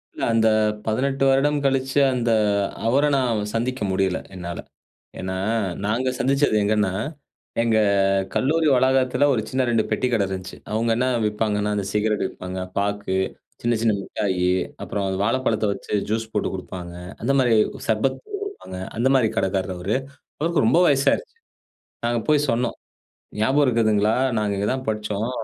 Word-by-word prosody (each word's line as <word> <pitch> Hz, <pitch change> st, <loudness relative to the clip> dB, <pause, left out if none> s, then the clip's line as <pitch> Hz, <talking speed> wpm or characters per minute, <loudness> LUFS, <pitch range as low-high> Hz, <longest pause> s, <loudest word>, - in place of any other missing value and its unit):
இல்ல. -, -, -5 dB
அந்த 110 Hz, 0 st, +4 dB, 0.4 s
18 135 Hz, +5 st, 0 dB
வருடம் 145 Hz, +2 st, +3 dB
கழிச்சு, 135 Hz, +1 st, +1 dB
அந்த 120 Hz, -2 st, 0 dB, 0.6 s
அவர 135 Hz, +5 st, +3 dB
நான் 120 Hz, -5 st, +1 dB
சந்திக்க 125 Hz, +2 st, -2 dB
முடியல, 95 Hz, -1 st, +1 dB, 0.2 s
என்னால. 85 Hz, -1 st, -6 dB, 0.6 s
ஏன்னா, 95 Hz, 0 st, -3 dB, 0.5 s
நாங்க 120 Hz, +5 st, 0 dB
சந்திச்சது 135 Hz, -3 st, +2 dB
எங்கன்னா, 105 Hz, -2 st, +1 dB, 0.7 s
எங்க 115 Hz, -2 st, +2 dB, 0.6 s
கல்லூரி 155 Hz, +3 st, +2 dB
வளாகத்தில 130 Hz, +1 st, +3 dB
ஒரு 115 Hz, -, +1 dB
சின்ன 130 Hz, 0 st, 0 dB
2 115 Hz, -2 st, +3 dB
பெட்டி 115 Hz, +4 st, 0 dB
கடை 105 Hz, -4 st, +2 dB
இருந்துச்சு. 95 Hz, -1 st, -6 dB, 0.2 s
அவுங்க 115 Hz, +2 st, +1 dB
என்ன 125 Hz, +2 st, +1 dB, 0.2 s
விப்பாங்கன்னா, 105 Hz, -1 st, 0 dB
அந்த 100 Hz, -, -1 dB
சிகரெட் 105 Hz, -1 st, +1 dB
விப்பாங்க. 90 Hz, 0 st, -7 dB, 0.2 s
பாக்கு, 100 Hz, -1 st, -1 dB, 0.5 s
சின்ன 120 Hz, -1 st, +1 dB
சின்ன 110 Hz, -2 st, +3 dB
முட்டாயி, 95 Hz, -3 st, -1 dB, 0.4 s
அப்புறம் 100 Hz, -1 st, -3 dB, 0.2 s
வாழைப்பழத்த 115 Hz, -2 st, +1 dB
வச்சு -, -, -8 dB, 0.2 s
ஜூஸ் 110 Hz, 0 st, -2 dB
போட்டு 105 Hz, -, 0 dB
குடுப்பாங்க. 90 Hz, -1 st, -7 dB, 0.3 s
அந்த 135 Hz, +4 st, +2 dB
மாரி, 120 Hz, -3 st, +3 dB, 0.3 s
சர்பத் 110 Hz, +5 st, +1 dB
போட்டு 415 Hz, -1 st, -6 dB
குடுப்பாங்க. 400 Hz, -, -8 dB, 0.2 s
அந்த 125 Hz, -, +3 dB
மாரி 120 Hz, -4 st, +3 dB
கடைக்காரர் 95 Hz, -1 st, 0 dB
அவரு. 95 Hz, +7 st, -1 dB, 0.4 s
அவருக்கு 165 Hz, +3 st, +1 dB
ரொம்ப 165 Hz, -, +4 dB
வயசாயிருச்சு. 150 Hz, -, +1 dB, 0.7 s
நாங்க 120 Hz, 0 st, +1 dB
போய் 150 Hz, -1 st, +3 dB
சொன்னோம். 120 Hz, +1 st, 0 dB, 0.6 s
ஞாபகம் 135 Hz, +7 st, +3 dB
இருக்குதுங்களா? 110 Hz, -3 st, +2 dB, 0.2 s
நாங்க 105 Hz, -1 st, 0 dB
இங்க 100 Hz, +1 st, 0 dB
தான் 130 Hz, 0 st, -5 dB
படிச்சோம். 105 Hz, +2 st, -2 dB
115 Hz, 145 wpm, -23 LUFS, 105-130 Hz, 0.7 s, அந்த